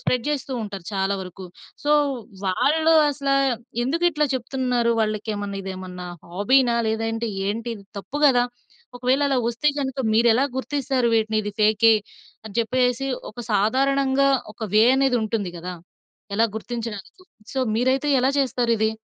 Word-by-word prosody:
Spread 250 -2 0
జేస్తూ 280 -2 -2
ఉంటారు 195 -4 -7
చాలా 195 0 0
వరకు. 185 +1 -9 0.4
సో 295 - +1 0.6
వాళ్ళు 315 - +3 0.2
అసల 280 -1 -3 0.5
ఎందుకు 330 +7 -1
ఇట్లా 300 -2 +1
చెప్తున్నారు. 250 -2 0
వాళ్ళకి 215 0 -1
ఏమన్నా 200 -1 -4
ఇదేమన్నా 185 -1 -7 0.2
హాబీనా! 235 +7 +3
లేదా 220 +1 -1 0.5
ఏంటి 230 +3 -4
ఇది 200 -3 -13
తప్పు 230 +8 -7
గదా! 245 -3 +4 0.5
ఒకవేళ 255 +3 +1
అలా 270 - +1
వస్తే 240 +5 +1
గనుక 270 -1 -3 0.2
మీరు 235 +2 +4
ఎలా 260 +4 +3
గుర్తిస్తారు 265 -2 0
వీటిని? 220 -1 +1
ఇది 205 - -4
ఫేకే 215 +1 +5 0.5
అని 215 -2 -9
చెప్పేసేసి 250 +3 +1 0.2
ఒక 240 - -9
సాధారణంగా 270 +6 +2 0.2
ఒక 215 - -12
వే 215 - +6
అనేది 270 -2 +3
ఉంటుంది 215 -4 -2
గదా! 180 +2 -6 0.6
ఎలా 225 +3 +4
గుర్తించడానికి 225 - -6 0.3
సో, 270 - -3 0.2
మీరైతే 260 +5 +1
ఎలా 255 +2 +2
చేస్తారిది? 235 -4 +1
235 Hz, 140 wpm, -23 LUFS, 210-265 Hz, 0.6 s, వే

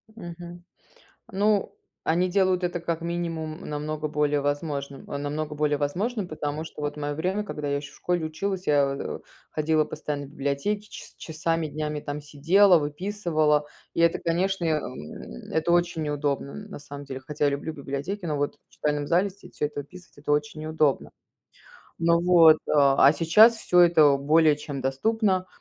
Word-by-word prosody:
Мгм. 175 -2 -9 0.7
Ну, 205 +1 +1 0.3
они 180 +3 +2
делают 185 -1 +2
это, 175 0 -1
как 170 -1 -3
минимум, 165 -2 -3
намного 150 +1 -3
более 150 -1 +1
возможным 140 -1 -3
намного 150 +2 -4
более 150 -1 +1
возможным, 190 - -2
потому 150 0 -4
что 155 - -9
вот 145 +1 -3
мое 145 0 -3
время, 185 +7 -1
когда 150 -7 -5
я 140 - 0
еще 145 0 -8
в - - -17
школе 175 -2 -1
училась, 190 +4 -3
я, 140 -2 +3
э, - - -5 0.3
ходила 155 0 +2
постоянно 150 -2 -5
в 135 - -13
библиотеки, 150 +9 -2
час - - -11
часами, 165 0 -2
днями 150 0 -3
там 145 0 -5
сидела, 165 +6 +4
выписывала, 155 -2 0 0.3
и 165 - 0
это, 170 0 +4
конечно, 180 +2 0
эм, 125 - -5
это 160 +2 +1
очень 175 -2 +1
неудобно, 145 -2 -2
н 210 0 -9
на 195 - -8
самом 145 0 -9
деле. 135 -1 -6
Хотя 145 +2 -2
я 145 - +3
люблю 140 +3 -4
библиотеки, 145 +7 -5
но 150 -3 -1
вот 145 0 -1
в - - -32
читальном 150 -1 -1
зале 180 +5 +2
сидеть, 195 +2 -16
всё - - 0
это 145 -1 -4
выписывать, 180 +5 -15
это 145 0 -3
очень 150 +1 -1
неудобно. 155 -3 0 0.9
Ну 170 0 +3
вот, 165 -3 +7
а 140 -1 +6
сейчас 210 +9 +6
всё 180 -4 +3
это 155 -5 +6
более 150 +2 +4
чем 145 -2 -6
доступно, 185 - +1
155 Hz, 170 wpm, -26 LUFS, 145-175 Hz, 0.9 s, вот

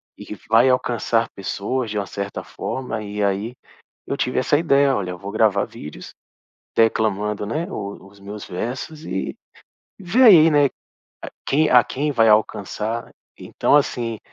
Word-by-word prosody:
e - - -11
que - - -6
vai 115 +4 +5
alcançar 120 -2 +1
pessoas 105 +6 -3
de 105 - -4
uma 100 - -1
certa 100 +2 -5
forma 130 -4 -5
e 105 0 -4
aí 100 +5 -1 0.5
eu 140 - -2
tive 125 - -1
essa 140 +3 +2
ideia: 140 -4 +3
"Olha, 95 -3 -3
eu 90 - -7
vou 100 0 -7
gravar 105 -2 +2
vídeos, 75 - -10 0.6
declamando, 105 -2 +1
né, 155 +11 -3
o 100 - -7
os 100 0 -18
meus 100 +1 -8
versos 130 - -5
e 95 -7 -4 0.6
vê 195 +7 +1
aí, 175 -10 +8
né, 145 -2 +4 0.8
quem 155 +2 +2
a 125 -1 +6
quem 150 +3 -2
vai 115 -5 +3
alcançar". 105 +2 0 0.3
Então - - +1
assim, 120 -6 0
115 Hz, 155 wpm, -21 LUFS, 100-135 Hz, 0.8 s, aí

